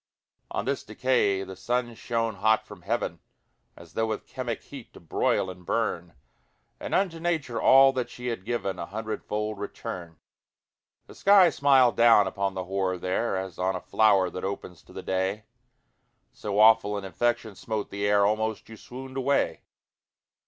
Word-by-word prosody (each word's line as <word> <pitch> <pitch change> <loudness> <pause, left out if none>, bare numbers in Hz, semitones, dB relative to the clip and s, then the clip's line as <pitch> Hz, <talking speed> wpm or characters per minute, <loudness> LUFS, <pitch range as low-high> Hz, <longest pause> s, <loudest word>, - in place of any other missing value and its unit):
On 105 - -3
this 140 +1 -2
decay 105 -7 +1
the 95 0 -8
sun 120 +4 -2
shone 115 -2 -2
hot 110 +3 +2
from - - -12
heaven - - -2 0.6
As 85 -2 -15
though 110 0 0
with 110 -1 -4
chemic 125 -4 -5
heat 135 -5 -11
to - - -13
broil 85 +3 0
and 90 -1 -9
burn, - - -2 0.6
And - - -3
unto 180 -4 0
Nature 160 -8 -1
all 135 0 +7
that 125 -2 -2
she 125 0 -10
had 115 -6 -4
given 110 -3 -3
A - - -5
hundredfold 105 0 -4
return. 85 -4 -7 0.9
The - - -14
sky 195 -4 +6
smiled 135 -5 +4
down 115 -3 +6
upon 100 +1 -2
the 95 - -3
horror 95 0 -1
there 95 +4 -1
As 95 -2 -6
on 95 +1 0
a - - -3
flower 100 -1 +3
that 90 - -6
opens 95 -2 -5
to - - -17
the - - -8
day; 95 +3 -2 0.9
So 105 -1 -4
awful 110 -1 +5
an 100 - -5
infection 115 +4 -1
smote 105 +2 -4
the 100 +1 -1
air, 100 0 +4
Almost 110 +1 -1
you 110 - -10
swooned 130 +4 -9
away. 135 +2 +1
110 Hz, 165 wpm, -27 LUFS, 95-120 Hz, 0.9 s, all